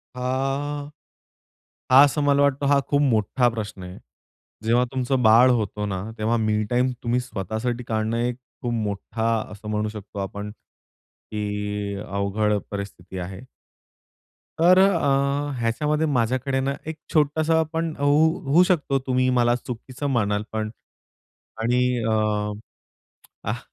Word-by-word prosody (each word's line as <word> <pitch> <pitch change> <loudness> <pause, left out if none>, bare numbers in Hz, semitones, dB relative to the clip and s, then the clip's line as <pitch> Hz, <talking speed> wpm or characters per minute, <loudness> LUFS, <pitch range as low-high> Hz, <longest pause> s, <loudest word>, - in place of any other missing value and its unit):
आ, - - -7 1.7
हा 130 +2 +9
असं 145 +1 -1
मला 140 0 +3
वाटतं, 140 0 +2
हा 140 0 +4
खूप 145 0 +2
मोठा 120 -1 +2
प्रश्न 105 -4 -6
आहे. 90 0 -9 0.7
जेव्हा 120 +2 +3
तुमचं 130 0 0
बाळ 115 +4 +7
होतो 105 -3 -1
ना, 95 -2 -3 0.2
तेव्हा 110 +2 +1
मी 110 -1 +1
टाईम 125 +1 +2
तुम्ही 120 +1 +1
स्वतःसाठी 120 +1 -3
काढणं, 110 +1 -1
एक 120 +1 0 0.3
खूप 120 - -2
मोठा 110 +1 -2 0.2
असं 105 +1 -9
म्हणू 105 0 -1
शकतो 105 -1 -8
आपण 100 +1 -5 0.8
की 105 -1 -3
अवघड 100 +1 0
परिस्थिती 100 -2 -7
आहे. 95 +3 -6 1.2
तर 180 +2 +6
अ, 190 -7 +4 0.5
ह्याच्यामध्ये 150 +7 0
माझ्याकडे 130 0 0
ना, 135 +1 0
एक 160 - -4 0.2
छोटासा 155 +2 +3
पण 165 0 -1
हो 145 - 0 0.4
होऊ 150 +7 +5
शकतो, 150 -7 +1
तुम्ही 130 0 +2
मला 120 0 +3
चुकीचं 125 +3 -6
म्हणाल 105 -3 +1
पण 110 -1 -2 0.9
आणि 125 +2 +2 0.2
अ, 110 - +1 1.4
आह, - - -1
120 Hz, 130 wpm, -24 LUFS, 105-135 Hz, 1.7 s, हा